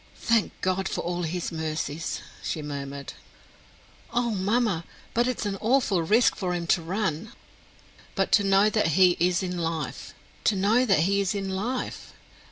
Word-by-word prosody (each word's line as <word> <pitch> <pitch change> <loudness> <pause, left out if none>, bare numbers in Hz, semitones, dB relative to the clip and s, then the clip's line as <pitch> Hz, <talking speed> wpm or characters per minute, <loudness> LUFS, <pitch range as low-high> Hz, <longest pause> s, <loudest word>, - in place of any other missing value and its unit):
"Thank 230 -3 +1
God 185 +1 0
for - - -2
all 175 +1 -2
his 175 +1 -3
mercies," 160 -1 -3 0.2
she 155 - -3
murmured. 140 -1 -6 1.0
"Oh, 240 -1 +1
mamma, 205 -2 +1 0.3
but 240 +1 +2
it 255 - -2
is - - -2
an 195 -1 -2
awful 225 -6 +2
risk 215 +9 +3
for 180 -3 -2
him 170 -1 -3
to 175 - -1
run!" 190 +3 -2 0.8
"But - - 0
to 205 - +5
know 195 +1 +4
that 215 -4 +2
he 180 -2 +6
is 175 +2 +2
in 180 -1 -3
life 165 -2 -4 0.3
to 215 - +4
know 215 +6 +3
that 195 -7 +4
he 200 +4 +2
is 195 +1 -1
in 195 -1 -3
life! 235 +7 -4
190 Hz, 170 wpm, -26 LUFS, 170-215 Hz, 1.0 s, he